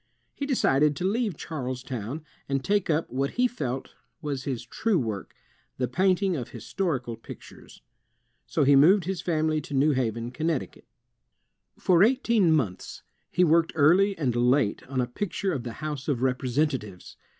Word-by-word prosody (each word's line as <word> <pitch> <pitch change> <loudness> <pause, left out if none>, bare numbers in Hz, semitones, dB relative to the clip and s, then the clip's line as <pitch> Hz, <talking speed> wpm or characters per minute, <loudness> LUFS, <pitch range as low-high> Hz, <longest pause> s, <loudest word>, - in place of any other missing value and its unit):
He 280 - -4
decided 150 - +3
to 160 - -5
leave 210 - 0
Charlestown, 130 -1 -5 0.2
and 135 -1 -1
take 205 -2 +1
up 160 +1 +1
what 135 +2 -1
he 250 0 +4
felt 135 - -5 0.3
was 145 -4 -4
his 125 -4 -3
true 210 - 0
work, 110 - -4 0.4
the 125 - 0
painting 185 - +2
of 125 -6 -5
historical 130 - -3
pictures. 115 - -13 0.6
So - - +1
he 140 +1 +5
moved 175 +8 +6
his 190 -1 -3
family 155 -2 0
to 145 -1 -6
New 145 +3 +4
Haven, 120 -3 -1
Con 155 +5 -3
necticut. 160 -6 -3 0.9
For 180 -2 +3
eighteen 230 -5 +3
months, 110 - -1 0.3
he 180 - +2
worked 165 0 +3
early 180 +7 +4
and 130 -6 0
late 125 -1 +2
on 130 -1 -1
a - - +1
picture 190 - -3
of 135 - -2
the 120 -1 -6
House 150 -3 -4
of 130 -5 0
Representatives. 130 - -1
145 Hz, 160 wpm, -26 LUFS, 130-180 Hz, 0.9 s, moved